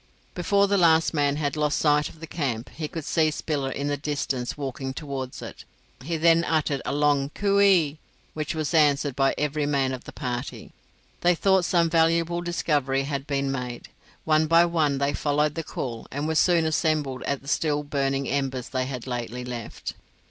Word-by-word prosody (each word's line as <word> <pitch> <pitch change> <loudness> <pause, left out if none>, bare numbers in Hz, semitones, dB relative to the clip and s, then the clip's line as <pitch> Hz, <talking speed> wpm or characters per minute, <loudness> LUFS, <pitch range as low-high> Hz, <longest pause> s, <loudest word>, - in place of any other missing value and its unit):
Before 200 +3 +2
the 200 0 +2
last 165 -2 +4
man 145 -2 +1
had 145 -1 -1
lost 150 -1 +1
sight 150 -1 +2
of 160 - -16
the - - -5
camp, 135 -8 -3
he 155 -1 -5
could 160 -1 -6
see 160 -2 +2
Spiller 145 -2 -2
in 140 +2 -4
the 145 0 0
distance 140 -4 -3
walking 135 -1 -4
towards 135 -4 -5
it. - - -9 0.4
He 165 +3 -2
then 165 +1 +4
uttered 155 -5 0
a - - 0
long 145 -1 +2
coo 200 -1 +2
ee, 170 -7 +4 0.3
which 155 +1 -3
was 155 +1 -2
answered 145 -3 +3
by 135 0 +2
every 150 0 -1
man 135 -2 +1
of 130 - -7
the - - -8
party. 125 +1 -5 0.5
They 175 0 +3
thought 190 0 +3
some 170 -1 +3
valuable 165 +1 +2
discovery 145 -6 0
had 140 0 -4
been 140 -1 -1
made. 125 -2 -5 0.4
One 155 0 +3
by 165 +2 +6
one 155 -5 +1
they 140 +1 0
followed 150 +1 +1
the 165 - -3
call 120 -6 -5
and 145 +3 -3
were 160 - 0
soon 170 0 +3
assembled 155 -4 0
at 140 -1 -2
the - - -14
still 150 0 0
burning 140 -1 -1
embers 135 -3 -2
they 130 -1 -1
had 130 -3 -5
lately 125 0 -4
left. 120 -3 -6
145 Hz, 190 wpm, -25 LUFS, 135-160 Hz, 0.5 s, by